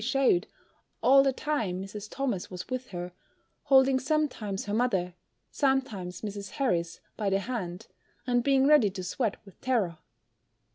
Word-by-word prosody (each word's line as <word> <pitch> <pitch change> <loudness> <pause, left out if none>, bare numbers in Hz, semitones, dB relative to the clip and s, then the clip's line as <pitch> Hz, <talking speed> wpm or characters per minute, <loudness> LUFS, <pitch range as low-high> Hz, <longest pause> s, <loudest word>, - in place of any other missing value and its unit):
shewed 250 -7 +2 0.6
all 270 +1 +7
the 270 0 +3
time 250 -10 -2
Mrs. 205 +1 -7
Thomas 250 -9 -2
was 180 -1 -7
with 255 0 -3
her, 180 -1 -6 0.5
holding 265 -1 +5
sometimes 260 -9 -1
her 205 - -3
mother, 200 -7 +1 0.4
sometimes 225 - -1
Mrs. 200 -2 -5
Harris, 175 - -1 0.2
by 210 -3 0
the 195 - +2
hand, 200 -4 -4 0.4
and 245 -1 +2
being 270 0 +4
ready 285 -8 +6
to 185 -1 -6
sweat 210 +4 -1
with 195 - -17
terror. 210 -11 0
225 Hz, 145 wpm, -28 LUFS, 190-265 Hz, 0.6 s, all